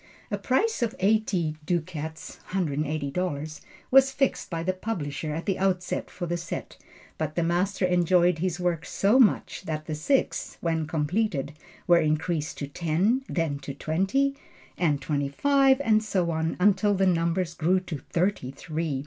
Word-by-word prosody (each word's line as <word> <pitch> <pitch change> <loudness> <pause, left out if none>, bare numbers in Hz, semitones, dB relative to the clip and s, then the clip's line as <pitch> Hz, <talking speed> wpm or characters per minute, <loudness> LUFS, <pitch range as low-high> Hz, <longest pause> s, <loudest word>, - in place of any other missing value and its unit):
A 205 - 0
price 265 - +1
of 230 -2 0
eighty 190 -6 +1
ducats 160 -2 -4
($180) 155 -1 -2 0.3
was 270 +1 +6
fixed 270 0 0
by 165 -2 -3
the 185 +2 0
publisher 160 -7 -4
at 165 - -4
the 195 -2 -1
outset 185 -2 -1
for 180 - -5
the 175 0 -1
set, 170 0 -6 0.4
but 155 -1 -2
the 170 - +1
master 185 +3 +1
enjoyed 180 -1 +3
his 180 0 -1
work 175 -3 0
so 200 +7 +2
much, 235 -5 +3
that 155 -2 -4
the 155 - -4
six, 260 - 0
when 165 -2 -1
completed, 155 -1 -1 0.3
were 175 -1 +6
increased 155 0 -1
to 140 - -4
ten, 170 - +1
then 160 -5 -1
to 140 -1 -7
twenty, 195 - 0 0.4
and 145 -6 0
twenty 140 -1 -1
five, 270 - +3
and 215 -4 +3
so 185 -5 0
on 160 0 -1
until 200 +1 +3
the 195 0 +2
number 170 0 +2
grew 180 +4 +3
to 165 -6 -6
thirty 180 -6 0
three. 150 +1 -3
175 Hz, 155 wpm, -26 LUFS, 155-195 Hz, 0.4 s, was